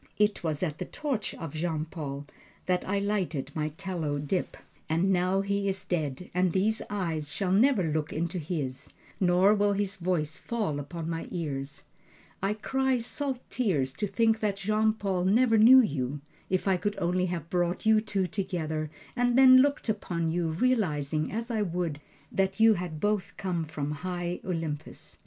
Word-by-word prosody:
It 210 Hz, -2 st, +2 dB
was 155 Hz, 0 st, -1 dB
at 155 Hz, -4 st, -2 dB
the -, -, -3 dB
torch 275 Hz, -8 st, -3 dB
of 165 Hz, -4 st, -7 dB
Jean 160 Hz, -1 st, -2 dB
Paul 145 Hz, -4 st, -6 dB, 0.4 s
that 180 Hz, -1 st, +1 dB
I 200 Hz, -, +1 dB
lighted 190 Hz, -9 st, -1 dB
my 155 Hz, -1 st, -1 dB
tallow 170 Hz, -7 st, -2 dB
dip, 145 Hz, +6 st, -2 dB, 0.3 s
and 175 Hz, +5 st, +2 dB
now 185 Hz, +2 st, +2 dB
he 200 Hz, 0 st, 0 dB
is 190 Hz, 0 st, -3 dB
dead 160 Hz, -3 st, -2 dB
and 180 Hz, 0 st, +2 dB
these 215 Hz, +4 st, +1 dB
eyes 165 Hz, -7 st, -2 dB
shall 185 Hz, +6 st, -1 dB
never 220 Hz, +1 st, +4 dB
look 155 Hz, -1 st, -1 dB
into 170 Hz, +3 st, -2 dB
his, 145 Hz, -5 st, -4 dB, 0.3 s
nor 185 Hz, +2 st, +5 dB
will 205 Hz, -1 st, +2 dB
his 200 Hz, -1 st, -2 dB
voice 170 Hz, -4 st, -1 dB
fall 210 Hz, -11 st, -2 dB
upon 165 Hz, +3 st, -6 dB
my 165 Hz, 0 st, -3 dB
ears. 140 Hz, -5 st, -4 dB, 0.6 s
I 195 Hz, +2 st, 0 dB
cry 265 Hz, +4 st, 0 dB
salt 260 Hz, +2 st, -3 dB
tears 150 Hz, -, 0 dB
to 205 Hz, -, -2 dB
think 225 Hz, +2 st, +2 dB
that 205 Hz, -2 st, 0 dB
Jean 215 Hz, +2 st, +2 dB
Paul 195 Hz, -4 st, -1 dB
never 225 Hz, +3 st, +4 dB
knew 255 Hz, +4 st, +9 dB
you. 140 Hz, -, -2 dB, 0.3 s
If 185 Hz, +1 st, 0 dB
I 190 Hz, -1 st, +3 dB
could 205 Hz, +4 st, -2 dB
only 180 Hz, +1 st, +1 dB
have 170 Hz, -2 st, -5 dB
brought 175 Hz, +3 st, 0 dB
you 220 Hz, 0 st, +5 dB
two 200 Hz, -3 st, -1 dB
together 160 Hz, -5 st, -3 dB, 0.3 s
and 245 Hz, 0 st, +2 dB
then 260 Hz, -1 st, +9 dB
looked 285 Hz, +2 st, +3 dB
upon 170 Hz, -6 st, -1 dB
you, 170 Hz, 0 st, 0 dB
realizing, 160 Hz, -, 0 dB
as 230 Hz, +3 st, -3 dB
I 220 Hz, -2 st, 0 dB
would, 170 Hz, -6 st, -2 dB, 0.3 s
that 195 Hz, +1 st, 0 dB
you 225 Hz, 0 st, +7 dB
had 175 Hz, -5 st, -4 dB
both 200 Hz, -1 st, -1 dB
come 175 Hz, -4 st, -2 dB
from 150 Hz, -2 st, -4 dB
High 175 Hz, +2 st, -3 dB
Olympus! 160 Hz, -4 st, -5 dB
180 Hz, 175 wpm, -28 LUFS, 160-210 Hz, 0.6 s, knew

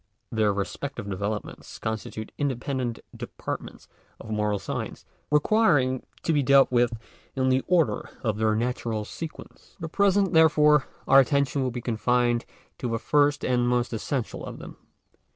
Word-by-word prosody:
Their 110 Hz, -2 st, +2 dB
respective 100 Hz, +5 st, -4 dB
developments 100 Hz, +2 st, -5 dB
constitute 110 Hz, 0 st, -5 dB
independent 130 Hz, -3 st, -2 dB, 0.2 s
departments -, -, -7 dB, 0.3 s
of 110 Hz, -, -9 dB
moral 105 Hz, -1 st, 0 dB
science, -, -, -5 dB, 0.2 s
requiring 150 Hz, -, +3 dB, 0.2 s
to 165 Hz, -, +1 dB
be 145 Hz, -, +3 dB
dealt 140 Hz, 0 st, +5 dB
with 120 Hz, -1 st, +2 dB, 0.4 s
in 130 Hz, -1 st, +1 dB
the 130 Hz, 0 st, +2 dB
order 165 Hz, -12 st, +1 dB
of 110 Hz, -2 st, -1 dB
their 110 Hz, -1 st, +2 dB
natural 115 Hz, -2 st, -2 dB
sequence. 160 Hz, +8 st, -9 dB
For -, -, -24 dB
the 160 Hz, -, -3 dB
present, 200 Hz, +1 st, +2 dB
therefore, 150 Hz, -3 st, +5 dB, 0.2 s
our 135 Hz, -, +8 dB
attention 140 Hz, +1 st, +2 dB
will 130 Hz, -, 0 dB
be 125 Hz, 0 st, -5 dB
confined 120 Hz, 0 st, +1 dB, 0.3 s
to 125 Hz, -, -2 dB
the 115 Hz, -, 0 dB
first 145 Hz, +4 st, +2 dB
and 125 Hz, -1 st, +2 dB
most 125 Hz, 0 st, 0 dB
essential 115 Hz, +2 st, -3 dB
of -, -, -7 dB
them. -, -, -10 dB
125 Hz, 150 wpm, -26 LUFS, 110-145 Hz, 0.4 s, our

